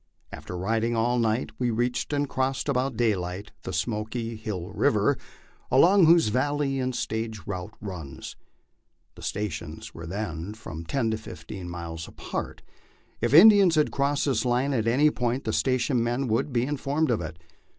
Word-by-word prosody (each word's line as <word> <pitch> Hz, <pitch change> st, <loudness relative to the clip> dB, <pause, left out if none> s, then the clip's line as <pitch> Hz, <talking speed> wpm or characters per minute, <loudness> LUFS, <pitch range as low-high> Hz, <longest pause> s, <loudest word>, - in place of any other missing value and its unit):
After 90 Hz, -, -7 dB
riding 115 Hz, +5 st, 0 dB
all 120 Hz, +2 st, +2 dB
night 115 Hz, +1 st, 0 dB
we 125 Hz, -1 st, +1 dB
reached 120 Hz, +4 st, -1 dB
and 145 Hz, -1 st, 0 dB
crossed 130 Hz, +1 st, -1 dB
about 130 Hz, -3 st, 0 dB
daylight 100 Hz, -3 st, -1 dB
the -, -, -6 dB
Smoky 110 Hz, +6 st, -2 dB
Hill 105 Hz, -6 st, -5 dB
river, -, -, +2 dB, 0.5 s
along 175 Hz, +7 st, +6 dB
whose 165 Hz, -7 st, +6 dB
valley 135 Hz, +3 st, 0 dB
the 130 Hz, 0 st, 0 dB
stage 110 Hz, -2 st, -3 dB
route 100 Hz, +1 st, -5 dB
runs. 90 Hz, -9 st, -7 dB, 0.8 s
The -, -, -14 dB
stations 85 Hz, -6 st, -4 dB
were 80 Hz, 0 st, -8 dB
then 95 Hz, 0 st, -4 dB
from 85 Hz, -7 st, -8 dB
ten 115 Hz, +4 st, 0 dB
to 110 Hz, -, -1 dB
fifteen 90 Hz, +2 st, -8 dB
miles 85 Hz, -2 st, -6 dB
apart; -, -, -6 dB, 0.6 s
if 120 Hz, -, +1 dB
Indians 195 Hz, +2 st, +8 dB
had 150 Hz, -1 st, +3 dB
crossed 140 Hz, +1 st, +1 dB
this 135 Hz, -3 st, +1 dB
line 125 Hz, +3 st, +1 dB
at 115 Hz, -3 st, 0 dB
any 145 Hz, +6 st, +4 dB
point 125 Hz, +1 st, -1 dB
the -, -, -2 dB
station 130 Hz, -1 st, +1 dB
men 120 Hz, +3 st, -1 dB
would 115 Hz, +6 st, 0 dB
be 120 Hz, -1 st, +1 dB
informed 145 Hz, +2 st, 0 dB
of 110 Hz, -, +1 dB
it. 80 Hz, -1 st, -6 dB
115 Hz, 160 wpm, -26 LUFS, 100-135 Hz, 0.8 s, Indians